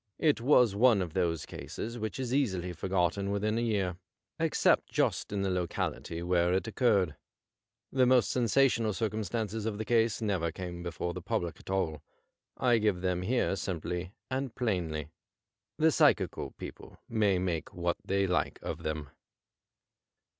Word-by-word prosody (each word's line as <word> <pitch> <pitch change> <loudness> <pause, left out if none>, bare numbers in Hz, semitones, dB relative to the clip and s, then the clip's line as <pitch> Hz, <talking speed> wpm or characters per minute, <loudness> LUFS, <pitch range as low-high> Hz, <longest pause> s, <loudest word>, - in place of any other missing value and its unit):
It 150 -7 +2
was 125 -4 +5
one 115 -1 +5
of 85 -3 -7
those 85 -4 0
cases 115 +2 -6
which 110 +4 -4
is 125 -1 -2
easily 95 -10 0
forgotten 95 +1 0
within 105 +3 0
a - - 0
year, 100 -6 0 0.4
except - - +3
just - - 0
in 100 -1 -1
the 95 - 0
locality 85 -1 -2
where 90 0 +2
it 95 - +1
occurred. 105 - +2 0.8
The 130 -1 +4
most 125 -5 +4
sen 125 -2 +1
sational 115 -3 +3
circumstances 110 0 -2
of 105 -2 -2
the 110 - -3
case 115 -1 +2
never 95 -7 0
came 90 -2 -6
before 85 0 -3
the - - -6
public 85 -1 -2
at - - -13
all. 80 -6 -1 0.6
I 120 -2 +3
give 105 -4 +1
them 90 -1 0
here 120 +7 +1
sinaply 90 0 -4 0.2
and 130 -2 -2
plainly. 85 - -1 0.7
The 160 +1 +4
psychical - - +2
people - - -10
may 105 -4 +2
make 90 -3 -2
what 85 0 -1
they 100 0 +1
like 90 - 0
of - - -4
them. 75 -2 -4
100 Hz, 155 wpm, -30 LUFS, 90-115 Hz, 0.8 s, was